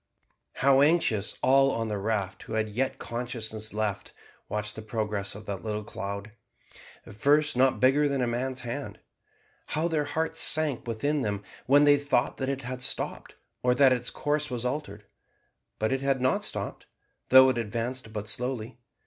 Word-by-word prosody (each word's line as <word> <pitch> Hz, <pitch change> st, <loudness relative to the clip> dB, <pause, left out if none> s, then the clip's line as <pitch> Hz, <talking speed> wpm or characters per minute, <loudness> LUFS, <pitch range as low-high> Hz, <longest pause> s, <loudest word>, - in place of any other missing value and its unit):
How 135 Hz, 0 st, +4 dB
anxiously 145 Hz, -, +2 dB
all 135 Hz, +1 st, +5 dB
on 115 Hz, -4 st, -1 dB
the 105 Hz, -1 st, -2 dB
raft, 100 Hz, -2 st, -2 dB
who -, -, -8 dB
had 110 Hz, -1 st, 0 dB
yet 130 Hz, +5 st, -1 dB
consciousness 115 Hz, -3 st, -4 dB
left, 105 Hz, -2 st, -3 dB, 0.4 s
watched 105 Hz, 0 st, -3 dB
the 110 Hz, -, -7 dB
progress 105 Hz, -3 st, -3 dB
of 105 Hz, 0 st, -10 dB
that 100 Hz, -2 st, -4 dB
little 105 Hz, -1 st, -3 dB
cloud, 100 Hz, +1 st, -6 dB, 0.7 s
at -, -, -11 dB
first 145 Hz, +7 st, +3 dB
not 130 Hz, +1 st, +3 dB
bigger 140 Hz, +3 st, +4 dB
than 140 Hz, -1 st, -1 dB
a 125 Hz, -, +2 dB
man's 125 Hz, +2 st, -2 dB
hand. 125 Hz, +4 st, -5 dB, 0.7 s
How 160 Hz, +2 st, 0 dB
their 155 Hz, -3 st, 0 dB
hearts 160 Hz, +2 st, -2 dB
sank 155 Hz, -6 st, +3 dB
within 140 Hz, +6 st, -1 dB
them 100 Hz, -3 st, -2 dB, 0.2 s
when 145 Hz, +3 st, +6 dB
they 145 Hz, 0 st, +6 dB
thought 140 Hz, -2 st, 0 dB
that 130 Hz, 0 st, -2 dB
it 135 Hz, -1 st, -3 dB
had 125 Hz, +1 st, -5 dB
stopped, -, -, -3 dB, 0.3 s
or 125 Hz, 0 st, +2 dB
that 135 Hz, -1 st, +6 dB
its 125 Hz, -1 st, -1 dB
course 150 Hz, 0 st, -1 dB
was 125 Hz, -2 st, -4 dB
altered; 125 Hz, -6 st, -4 dB, 0.7 s
but 110 Hz, +2 st, 0 dB
it 135 Hz, 0 st, 0 dB
had 135 Hz, -1 st, +1 dB
not 130 Hz, +1 st, +1 dB
stopped, -, -, -4 dB, 0.4 s
though 130 Hz, 0 st, +8 dB
it 125 Hz, -2 st, 0 dB
advanced 115 Hz, +2 st, -3 dB
but 105 Hz, -1 st, -5 dB
slowly. 120 Hz, +1 st, -4 dB
125 Hz, 175 wpm, -28 LUFS, 110-135 Hz, 0.7 s, though